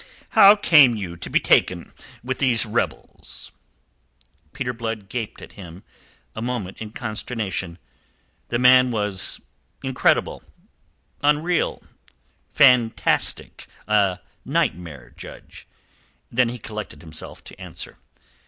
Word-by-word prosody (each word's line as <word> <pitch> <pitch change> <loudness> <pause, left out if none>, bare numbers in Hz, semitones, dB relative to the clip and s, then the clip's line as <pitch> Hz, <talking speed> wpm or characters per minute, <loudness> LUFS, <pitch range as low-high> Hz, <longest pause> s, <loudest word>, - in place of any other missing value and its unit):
How 205 -2 +8
came 150 - +6
you 95 -5 -5
to 85 - -8
be - - +3
taken 90 -2 +1 0.3
with 130 +1 -4
these 120 -5 +3
rebels?" 105 - -5 1.0
Peter 125 -2 -4
Blood 110 -4 -5
gaped 115 -2 -5
at - - -11
him 90 -2 -12 0.5
a 110 - -5
moment 115 -6 -4
in 110 - -6
consternation. 105 -5 -4 0.7
The 120 - -1
man 125 +1 +6
was 105 -5 -1 0.4
incredible, 130 -1 +1 0.8
unreal, 150 +4 +1 0.7
fantastic, 125 -4 +2 0.2
a 100 -4 +2 0.3
nightmare 80 -7 -3
judge. - - -12 0.6
Then 125 0 +2
he 120 - -6
collected 110 -5 -8
himself 80 -1 -8
to - - -14
answer. - - -9
115 Hz, 105 wpm, -22 LUFS, 95-125 Hz, 1.0 s, How